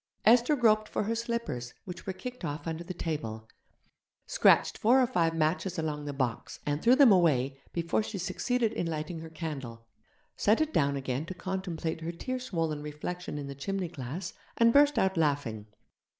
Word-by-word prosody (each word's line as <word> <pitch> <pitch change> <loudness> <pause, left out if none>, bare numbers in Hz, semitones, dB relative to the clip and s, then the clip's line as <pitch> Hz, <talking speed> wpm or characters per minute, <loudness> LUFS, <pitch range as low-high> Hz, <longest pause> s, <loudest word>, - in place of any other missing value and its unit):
Esther 240 +6 +6
groped 215 -4 +3
for - - -1
her 220 +3 -1
slippers, 230 - -3
which 180 0 -8
were - - 0
kicked 250 +5 -8
off 150 -1 -4
under 165 0 -3
the 170 - -7
table; 115 -11 -4 0.8
scratched - - +4
four 245 +5 +5
or 255 - +5
five 170 -9 +1
matches 165 +4 0
along 150 -2 -2
the 145 - -3
box 130 -5 -3
and 145 +1 -1
threw 245 +2 +6
them 270 -4 +7
away 140 -8 +3
before 170 +4 0
she 215 -1 -5
succeeded 230 +5 0
in 175 - -2
lighting 160 +1 -4
her 160 0 -8
candle; 135 -8 -6 0.5
set 215 +2 +3
it 315 0 0
down 140 -2 +2
again 135 0 -2
to 185 +3 -7
contemplate 180 -4 -3
her 165 +1 -3
tear 255 +9 -4
swollen 165 - -2
reflection 150 +3 -5
in 145 - -4
the 140 - -6
chimney 185 +6 -3
glass, 160 +4 -6 0.2
and 230 0 +5
burst 290 +1 +5
out 190 -1 +2
laughing. 140 -9 0
170 Hz, 180 wpm, -30 LUFS, 145-215 Hz, 0.8 s, them